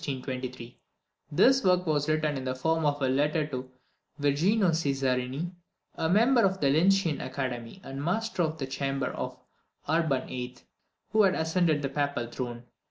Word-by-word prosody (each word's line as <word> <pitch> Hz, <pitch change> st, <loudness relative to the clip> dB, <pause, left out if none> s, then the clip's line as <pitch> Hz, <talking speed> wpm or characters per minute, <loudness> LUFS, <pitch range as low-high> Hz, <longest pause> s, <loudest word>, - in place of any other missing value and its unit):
This 265 Hz, -, +5 dB
work 180 Hz, -1 st, +3 dB
was 150 Hz, -2 st, 0 dB
written 155 Hz, -1 st, +1 dB
in 135 Hz, -, -4 dB
the 130 Hz, 0 st, -2 dB
form 160 Hz, +3 st, +1 dB
of 145 Hz, 0 st, 0 dB
a -, -, +3 dB
letter 150 Hz, +4 st, +1 dB
to 130 Hz, -3 st, -6 dB, 0.5 s
Virginio 170 Hz, +8 st, +3 dB
Cesarini, 135 Hz, 0 st, -1 dB, 0.4 s
a 160 Hz, -, -1 dB
member 235 Hz, +7 st, +5 dB
of 190 Hz, -2 st, +2 dB
the 140 Hz, -, +2 dB
Lyncæan 170 Hz, +1 st, +3 dB
Academy, 130 Hz, +1 st, -4 dB
and 135 Hz, +1 st, -6 dB
master 210 Hz, +4 st, -1 dB
of 160 Hz, -1 st, 0 dB
the 140 Hz, -, -3 dB
chamber 135 Hz, +1 st, -2 dB
to -, -, -4 dB, 0.5 s
Urban 155 Hz, -5 st, +1 dB
VIII., 125 Hz, 0 st, -6 dB, 0.5 s
who 215 Hz, +2 st, +4 dB
had 195 Hz, -2 st, +4 dB
just 160 Hz, 0 st, -1 dB
ascended 160 Hz, -5 st, +2 dB
the 140 Hz, -, -1 dB
papal 140 Hz, -3 st, -1 dB
throne. 120 Hz, -1 st, -5 dB
150 Hz, 160 wpm, -28 LUFS, 135-175 Hz, 0.5 s, This